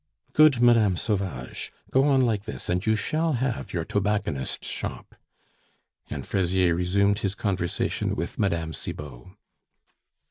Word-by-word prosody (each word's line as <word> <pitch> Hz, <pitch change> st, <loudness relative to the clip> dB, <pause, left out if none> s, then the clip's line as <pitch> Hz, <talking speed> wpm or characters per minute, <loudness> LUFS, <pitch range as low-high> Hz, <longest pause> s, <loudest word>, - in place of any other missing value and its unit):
"Good, 150 Hz, -5 st, +6 dB
Mme. 115 Hz, -6 st, +5 dB
Sauvage! 95 Hz, -, -3 dB, 0.2 s
Go 135 Hz, +1 st, +4 dB
on 135 Hz, -3 st, +4 dB
like 110 Hz, -4 st, 0 dB
this, 65 Hz, -, -6 dB
and 90 Hz, +1 st, 0 dB
you 110 Hz, 0 st, +2 dB
shall 155 Hz, +9 st, 0 dB
have 125 Hz, -1 st, -2 dB
your 85 Hz, -2 st, -2 dB
tobacconist's 100 Hz, -10 st, -1 dB
shop." -, -, -5 dB, 1.0 s
And -, -, -5 dB
Fraisier 95 Hz, -2 st, +2 dB
resumed 100 Hz, +4 st, +2 dB
his 100 Hz, -3 st, -2 dB
conversation 95 Hz, -4 st, -1 dB
with -, -, -4 dB
Mme. 85 Hz, -5 st, 0 dB
Cibot. 75 Hz, -4 st, -7 dB
100 Hz, 130 wpm, -26 LUFS, 85-115 Hz, 1.0 s, Good